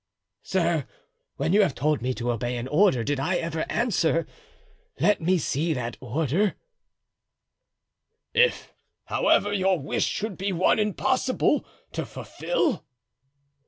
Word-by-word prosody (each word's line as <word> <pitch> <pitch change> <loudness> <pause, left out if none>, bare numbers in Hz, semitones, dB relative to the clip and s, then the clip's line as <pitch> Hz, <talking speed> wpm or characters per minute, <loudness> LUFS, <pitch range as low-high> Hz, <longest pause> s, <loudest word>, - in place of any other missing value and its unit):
"Sir, - - 0 0.5
when 170 - 0
you 210 - +6
have 180 -10 +1
told 150 +1 +1
me 125 +2 0
to 120 +2 -1
obey 120 +1 -2
an 120 +2 -4
order 150 - +3
did 145 +2 -1
I 175 +7 0
ever 165 -2 -2
answer, 175 -8 +1 0.7
'Let 210 -3 +3
me 180 +3 +3
see 160 +1 0
that 120 -2 -4
order'?" 155 - 0 1.8
"If, 475 +1 +2 0.3
however, 205 +1 +2
your 190 -2 +2
wish 140 - -1
should 210 -3 -3
be 195 +1 -1
one 185 +4 +3
impossible 255 +7 +1 0.3
to - - -4
fulfill?" 350 - -2
170 Hz, 125 wpm, -26 LUFS, 135-205 Hz, 1.8 s, you